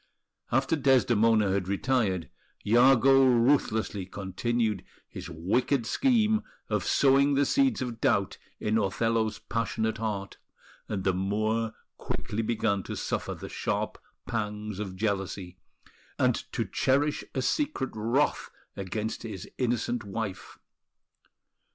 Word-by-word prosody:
After 135 +5 +2
Desdemona 115 -7 +3
had 95 -1 0
retired, 100 -4 0 0.4
Iago 135 +4 +6
ruthlessly 115 -6 +2
continued 105 +2 -1 0.2
his - - -8
wicked 110 - 0
scheme 220 - +2 0.3
of 105 -2 +1
sowing 140 +1 +4
the 140 +1 +3
seeds 270 - +2
of 120 -2 -6
doubt 100 -1 +1 0.2
in 110 +1 +1
Othello's 110 +2 0
passionate 110 -1 -2
heart; 100 -3 -4 0.5
and 100 -3 -2
the 95 - +2
Moor 110 +4 0 0.2
quickly 105 +2 -3
began 110 -3 0
to - - -6
suffer - - -3
the - - -8
sharp - - -2 0.3
pangs 105 -2 -3
of 95 -3 -4
jealousy, 95 -3 -3 0.6
and - - +3 0.2
to - - -1
cherish 145 +3 +1
a 130 - 0
secret 290 - -1
wrath 115 +7 0 0.3
against 105 +3 -4
his 105 -4 -7
innocent 120 -1 0
wife. 100 -1 -5
110 Hz, 115 wpm, -28 LUFS, 100-130 Hz, 0.6 s, Iago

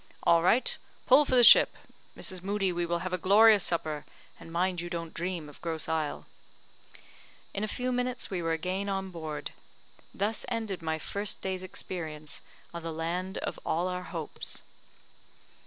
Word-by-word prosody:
"All 170 0 +5
right; 220 +9 +4 0.3
pull 275 +4 +7
for 260 - +1
the 245 - +7
ship. - - +8 0.4
Mrs. 185 -2 -3
Moodie, 195 0 0
we 175 0 -1
will 170 0 0
have 185 - -3
a 185 - 0
glorious 205 +2 +6
supper, 155 -3 -1 0.4
and 165 - -11
mind 180 +1 0
you 175 - -5
don't 165 -2 -5
dream 175 -2 -3
of 145 - -14
Grosse 165 -2 -2
Isle." 160 -2 -2 1.3
In 200 - -2
a - - 0
few 250 +4 -2
minutes 250 0 -1
we 185 -2 -1
were 165 -1 -1
again 185 +5 -2
on 195 -1 -2
board. 160 -3 -5 0.6
Thus 210 +3 -1
ended 220 -6 -3
my 160 -1 -1
first 200 +6 -2
day's 190 -1 -2
experience 160 -5 -6 0.3
of 170 - -5
the 165 0 -4
land 175 +4 -3
of - - -4
all 170 +3 0
our 180 0 -3
hopes. 165 -5 -2
180 Hz, 170 wpm, -29 LUFS, 165-200 Hz, 1.3 s, ship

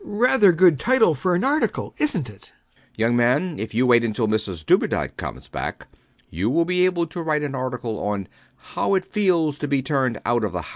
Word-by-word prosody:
Rather 240 - +3
a 175 - +3
good 170 -5 +5
title 245 -9 +3
for 175 +6 0
an 180 - 0
article, 290 +4 -1
isnt 195 - 0
it? 105 -3 -15 0.2
B. - - -33
B. - - -6
Young 120 +1 +2
man: 125 +8 +1
if 110 0 -6
you 125 +3 +2
wait 120 -1 +4
until 110 0 -1
Mrs 100 -7 -3
Dubedat - - +1
comes - - -7
back, - - -6 0.5
you 95 +7 -1
will 165 +6 +2
be 180 +1 +2
able 175 -2 0
to 170 +1 -7
write 155 -2 -1
an 145 -2 -4
article 125 -4 -4
on 100 -2 -3 0.5
How 195 - +1
It 190 - -1
Feels 170 -8 0
to 145 - -3
be 135 -2 0
Turned 130 -5 -1
Out 120 -1 +1
of 105 - -2
the - - -3
House. - - -11
140 Hz, 225 wpm, -22 LUFS, 115-180 Hz, 0.5 s, good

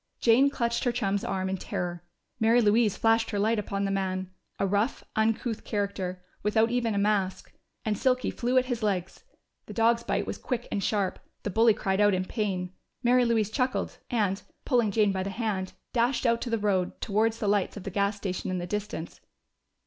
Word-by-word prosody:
Jane 250 +4 +5
clutched 235 -4 -1
her 245 - +3
chum's 205 -4 -1
arm 190 -1 -1
in 190 0 -1
terror; 175 -1 -4 0.4
Mary 225 +2 +5
Louise 215 -1 +3
flashed 225 0 +3
her 205 - -2
light 220 +2 +2
upon 200 -1 -2
the 195 - -1
man 185 -1 -2 0.3
a - - +1
rough, 205 +6 0
uncouth 225 +1 0
character, 195 -3 -3 0.2
without 220 +2 +2
even 235 -3 0
a - - 0
mask 200 -2 0 0.3
and 215 -1 +1
Silky 255 +3 +1
flew 250 +1 0
at 255 - +4
his 245 -2 -3
legs. 190 - -2 0.4
The - - -8
dog's 230 +1 +3
bite - - -1
was - - -5
quick 245 -2 -3
and 200 - -1
sharp: 200 -3 0 0.2
the 205 - -2
bully 225 +2 +5
cried 195 -2 0
out 205 -2 +5
in 185 0 -1
pain. 185 -4 -2 0.3
Mary 245 +1 +4
Louise 220 -3 +1
chuckled 255 +1 -1
and, 205 -5 0 0.2
pulling 240 -5 +3
Jane 205 0 +3
by 190 -1 -1
the 190 - -2
hand, 195 -3 -2 0.2
dashed 245 +2 +1
out 230 -1 +3
to 245 - -3
the 230 - +1
road, 195 -4 0
towards 220 +2 +1
the 215 - -2
lights 205 0 +1
of 200 - -7
the 195 - -5
gas 200 +2 0
station 190 -3 -3
in 185 - -1
the 175 - -3
distance. 200 -3 -5
210 Hz, 200 wpm, -28 LUFS, 195-230 Hz, 0.4 s, Jane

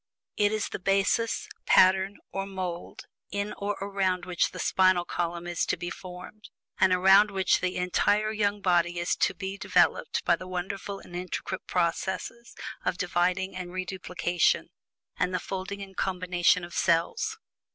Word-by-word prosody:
It 205 -1 +2
is 215 -1 -1
the - - -5
basis, 195 - +1 0.2
pattern, 190 +2 +5
or 195 0 -3
mould, 185 -3 -5 0.2
in 200 +2 -3
or 205 +1 -1
around 190 -3 -1
which 180 -2 +1
the - - -10
spinal 185 -2 +3
column 170 0 -3
is 175 -1 -1
to - - 0
be 175 0 -5
formed, 185 +3 -10 0.3
and 190 - +5
around 190 +3 +6
which 190 -2 +2
the 185 0 -1
entire 205 +4 +1
young 205 -1 0
body 175 -2 +2
is 175 0 0
to - - +1
be 195 0 -5
developed - - +2
by - - +4
the 185 - -9
wonderful 190 +2 -4
and 175 - -12
intricate 185 +1 -4
processes 185 +6 -2 0.3
of 175 - -1
dividing 180 +1 0
and 180 -1 -6
reduplication, 180 -2 0 0.5
and 185 - +1
the - - 0
folding 195 +1 -5
and 195 -1 -12
combination 180 -1 +2
of 175 0 -8
cells. 190 - +1
185 Hz, 155 wpm, -28 LUFS, 180-195 Hz, 0.5 s, around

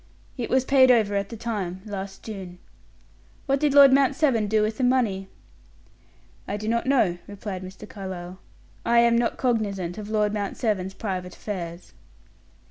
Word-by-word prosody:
"It 245 -3 -4
was 260 0 +2
paid 260 -2 +5
over 220 -5 +4
at 200 0 -1
the 230 - -7
time 200 -5 -4
last 195 -2 -6
June." 190 -5 -8 0.9
"What 275 -1 +1
did 290 -1 +1
Lord 280 -2 +9
Mount 275 0 +4
Severn 250 -9 +2
do 215 +1 +2
with 215 +1 -2
the - - 0
money?" 230 -7 +1 1.2
"I 205 - -2
do 215 +1 -6
not 235 +2 0
know," 215 -11 +2
replied 200 -2 -6
Mr. 190 +3 -10
Carlyle. 185 -2 -7 0.4
"I 235 - +2
am 235 0 +5
not 235 0 +1
cognizant 205 -7 -1
of 210 0 -7
Lord 210 -1 +1
Mount 205 -2 -3
Severn's 190 -5 -1
private 185 -4 -4
affairs." 175 -4 -6
210 Hz, 165 wpm, -25 LUFS, 190-235 Hz, 1.2 s, Lord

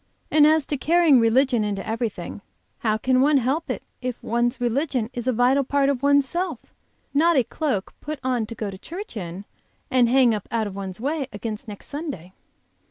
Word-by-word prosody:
And 300 -1 +6
as 310 -2 +3
to 290 - -2
carrying 325 -2 +4
religion 240 +1 +3
into 205 -2 -3
everything, 220 -5 -4 0.4
how 215 -2 +1
can 255 +3 +2
one 290 +1 +4
help 270 +6 0
it - - -3 0.2
if 250 -1 -2
one's 240 +2 0
religion 245 -1 0
is 240 0 -5
a - - +4
vital 250 +4 +3
part 280 +1 +1
of 270 -3 -1
one's 285 -1 +4
self, 355 +5 -4 0.4
not 330 +4 +4
a 260 - +5
cloak 255 - -2
put 305 +1 -5
on 250 -4 0
to 230 - -7
go 210 -3 -4
to 190 - -10
church 365 - -8
in 185 0 -6 0.5
and 250 -2 +4
hang 255 -2 +5
up 210 -3 -4
out 230 -2 0
of 205 - -5
the 195 +2 -6
way 285 -1 -1
against 215 +3 -6
next 205 -2 -8
Sunday?" 280 - -6
250 Hz, 195 wpm, -24 LUFS, 220-285 Hz, 0.5 s, And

